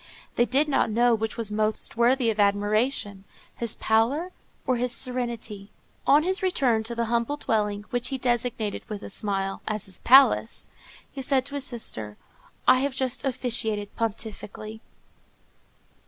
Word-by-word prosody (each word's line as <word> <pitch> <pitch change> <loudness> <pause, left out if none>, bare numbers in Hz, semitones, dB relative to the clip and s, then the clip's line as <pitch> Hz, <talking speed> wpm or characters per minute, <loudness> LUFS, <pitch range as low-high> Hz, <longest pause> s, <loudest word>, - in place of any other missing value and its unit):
They 240 - +4
did 275 +5 +2
not 275 - +2
know 240 +2 +3
which 220 0 -2
was 225 -3 -3
most 215 +1 -1
worthy 240 0 +3
of 215 - -6
admiration, 205 0 +1 0.3
his 235 -2 -1
pallor 250 +11 +1 0.3
or 255 -3 +1
his 250 0 0
serenity. 235 -5 -3 0.4
On 290 +2 +6
his 375 +2 0
return 265 -12 +2
to 235 +1 -4
the 235 0 0
humble 235 +5 0
dwelling, 210 -5 -1
which 245 0 -1
he 270 - -1
designated, 240 -4 -1
with 210 -2 -6
a - - -7
smile, 195 -1 -2
as 215 -2 -2
his 190 -2 -7
palace, 255 -3 +5 0.5
he 275 - -6
said 265 0 +2
to 280 - -8
his 285 -1 -2
sister, 110 - -5 0.5
_"I 255 - +7
have 275 0 -1
just 260 -2 -1
officiated 225 -6 -2
pontifically." 220 -1 -5
235 Hz, 155 wpm, -26 LUFS, 215-255 Hz, 0.5 s, I